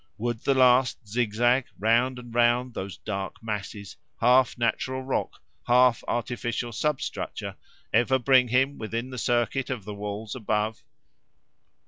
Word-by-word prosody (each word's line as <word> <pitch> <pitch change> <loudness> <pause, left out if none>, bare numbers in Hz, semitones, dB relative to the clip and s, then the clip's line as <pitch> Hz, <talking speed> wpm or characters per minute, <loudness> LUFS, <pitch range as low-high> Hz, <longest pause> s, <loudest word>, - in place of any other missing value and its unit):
Would 120 +1 -2
the 135 +3 +1
last 125 -2 +3
zigzag, 120 +3 +1
round 120 +5 +2
and 120 -2 -10
round 120 +1 +2
those 95 -2 -6
dark 95 -1 -5
masses, 105 -2 -5 0.2
half 125 +1 +4
natural 130 +2 -1
rock, 130 - -2 0.3
half 125 0 +4
artificial 120 0 -2
substructure, 150 +5 -3 0.4
ever 120 +4 +4
bring 130 0 +4
him 130 +4 +1
within 115 +3 -4
the 125 - -5
circuit 120 +3 0
of 120 -7 -4
the 105 - -6
walls 105 +1 -5
above? 110 -2 -2
120 Hz, 130 wpm, -26 LUFS, 110-125 Hz, 0.4 s, half